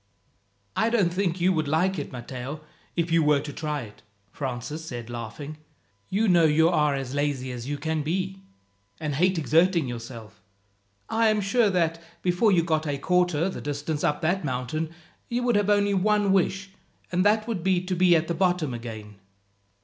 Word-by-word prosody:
"I 220 - +2
don't 200 -7 +2
think 185 -2 0
you 185 +2 +3
would 155 -3 0
like 180 +4 +1
it, 145 - -5
Matteo, 130 +4 -6 0.3
if 170 -1 0
you 165 0 +4
were 150 -2 +4
to 145 -1 -7
try 150 -1 -3
it," 105 -3 -12 0.3
Francis 135 +3 -5
said 120 -6 -7
laughing. 120 +6 -6 0.5
"You 215 +4 +1
know 175 -3 +5
you 160 +2 +4
are 150 -3 +2
as 135 -1 -4
lazy 140 -3 -1
as 120 0 -6
you 145 - -2
can 160 +1 -1
be, 190 +5 -2 0.6
and 150 -2 -2
hate 180 +6 +2
exerting 165 0 +3
yourself. 115 -3 -8 0.7
I 225 0 +2
am 215 -1 +3
sure 210 +3 +2
that, 165 -3 0 0.2
before 180 +5 +3
you 175 -3 +4
got 160 -1 0
a 145 -1 -1
quarter 180 +1 +2
the 190 - -5
distance 145 +1 -3
up 150 - +1
that 175 +4 +1
mountain, 135 +4 -2 0.4
you 245 +1 -1
would 240 -2 +2
have 205 0 +2
only 205 -1 +3
one 205 +1 +2
wish, 195 +1 0 0.4
and 180 +1 +2
that 215 +2 +3
would 220 -7 -2
be 185 0 +2
to 185 0 -1
be 180 -1 +5
at 160 0 +1
the 170 - -1
bottom 175 -6 +1
again." 110 -3 -8
160 Hz, 185 wpm, -26 LUFS, 145-185 Hz, 0.7 s, know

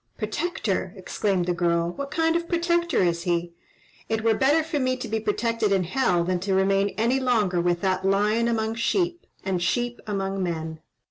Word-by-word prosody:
"Protector!" 215 - -2
exclaimed 190 -1 -1
the 180 - 0
girl. 170 0 +1
"What 280 +9 -6
kind 325 +2 +1
of 340 0 0
a - - -18
protector 340 - +1
is 170 -1 +1
he? 170 0 -1 0.6
It 220 0 -1
were 225 -1 +4
better 285 +8 +3
for 305 -2 -2
me 255 -1 0
to 255 - -5
be 220 +1 -1
protected 225 0 0
in 190 -2 +3
hell 180 -3 +1
than 180 +1 0
to 190 +1 -1
remain 195 +1 +2
any 235 +4 +2
longer 215 -9 +1
with 175 0 0
that 190 -1 0
lion 210 +4 +2
among 220 -1 0
sheep, 345 - -1 0.2
and 185 -2 -1
sheep 240 +7 -1
among 195 -1 -2
men! 160 -3 -3
205 Hz, 190 wpm, -25 LUFS, 180-255 Hz, 0.6 s, were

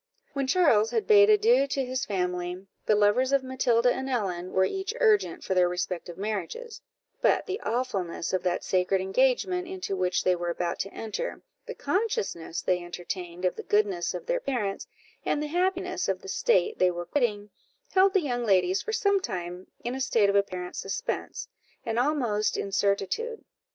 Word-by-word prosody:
When 275 -1 -1
Charles 260 -9 +4
had 440 -3 -1
bade 415 -1 +7
adieu 430 - +5
to 270 -1 -1
his 255 +1 -2
family, 180 -1 -2 0.2
the 215 - +5
lovers 210 +6 +3
of 275 -1 +3
Matilda 250 -2 +2
and 265 0 -4
Ellen 185 -7 -2
were 190 0 +3
each 390 - -3
urgent 420 -7 +3
for 190 - -1
their 180 -1 +4
respective 180 -1 -4
marriages: 215 - -4 0.4
but - - +3
the 395 +1 -4
awfulness 215 -9 -2
of 185 - +1
that 180 -1 -1
sacred 185 +1 +1
engagement 265 - +1
into 365 - -4
which 185 -1 0
they 185 - +3
were 175 0 -3
about 170 0 -2
to 195 - -2
enter, 225 - -5 0.2
the 480 - -6
consciousness 390 - -2
they 180 -1 +1
entertained 175 0 -6
of 180 - +1
the - - -6
goodness 200 -4 +1
of - - -6
their - - 0
parents, 225 - -2 0.4
and - - 0
the 300 - -2
happiness 365 0 0
of - - -2
the - - -9
state 470 -2 +1
they 185 - +5
were 175 0 -4
quitting, 210 -4 -1 0.4
held 385 0 +4
the 385 - +5
young 245 -5 -2
ladies 185 -3 +3
for - - -4
some 400 -4 +3
time 180 - -5 0.2
in 240 - -2
a 265 - -4
state 225 -6 +3
of - - -2
apparent 185 -3 -1
suspense, 195 - -4 0.4
and 230 0 0
almost 245 -7 +1
incertitude. 200 - -1
220 Hz, 175 wpm, -27 LUFS, -, 0.4 s, bade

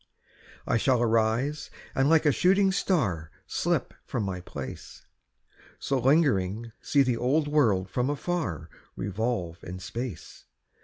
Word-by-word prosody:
I - - +2
shall 125 +1 +2
arise, 115 +5 +1 0.2
and 135 +2 +2
like 160 -1 +4
a 150 - +6
shooting 190 +6 +3
star 105 - 0 0.2
Slip - - -1
from - - -3
my 95 -2 -3
place; 70 -6 -8 0.7
So 135 -1 -1
lingering 115 - +2
see 140 -1 +3
the 125 -3 0
old 145 +6 +1
world 115 -11 +2
from 125 +6 -1
afar 145 - -2 0.3
Revolve 95 -4 -3
in 90 +1 -6
space. 115 +1 -7
120 Hz, 125 wpm, -27 LUFS, 95-145 Hz, 0.7 s, a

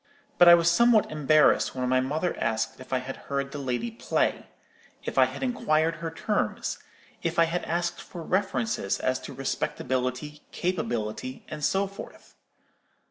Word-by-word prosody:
But 175 - +8
I 170 - +11
was 170 0 +1
somewhat 220 +4 +4
embarrassed 155 -1 +3
when 125 -1 -1
my 130 0 +3
mother 150 +7 -1
asked 115 +1 -1
if 130 - -12
I 130 - +2
had 130 +1 -5
heard 140 0 -2
the 145 - -5
lady 130 - -2
play; 225 - -1 0.6
if - - -5
I - - +7
had - - -6
inquired 165 -10 +1
her 165 0 -4
terms; 205 +6 -2 0.4
if 170 0 -2
I 170 - +6
had 170 +2 -2
asked 170 0 -2
for 170 -2 -9
references 125 - -1
as 130 0 0
to - - -9
respectability, 130 +1 -3
capability, 130 -8 -3
and 150 -1 -6
so 195 +6 +2
forth. 195 0 -11
155 Hz, 160 wpm, -27 LUFS, 130-170 Hz, 0.6 s, I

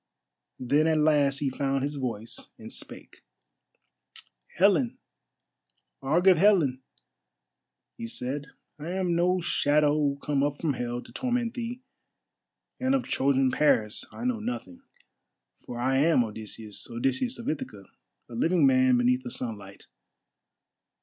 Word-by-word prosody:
Then 145 +5 +2
at 160 -1 +2
last 145 -3 +3
he 140 -2 0
found 135 0 -1
his 145 +1 -2
voice 120 -5 -5
and - - -10
spake. - - -9 1.3
"Helen! 175 - +3 1.0
Argive 175 +5 +4
Helen!" 165 -10 +4 1.2
he 115 - -5
said, 135 +5 -4 0.3
"I 155 +3 -6
am 185 -2 0
no 180 +2 +2
shadow 150 -3 +2
come 140 0 -1
up 145 0 -1
from 155 -4 0
Hell 120 -1 -4
to - - -15
torment 245 -2 -1
thee, 245 +1 -5 1.0
and 260 +1 +2
of 265 - 0
Trojan 135 -1 +2
Paris 110 -8 +2
I 240 - -7
know 250 -3 0
nothing. 250 +3 -6 0.9
For 120 - -6
I 130 +2 +1
am 155 -4 +4
Odysseus, 110 -1 -7
Odysseus 130 - -1
of 235 - -8
Ithaca, 105 -9 -4 0.4
a 120 - -12
living 165 +6 +2
man 130 -1 +4
beneath 125 +1 +2
the 125 - -7
sunlight. 105 -6 -6
145 Hz, 130 wpm, -27 LUFS, 125-175 Hz, 1.3 s, Argive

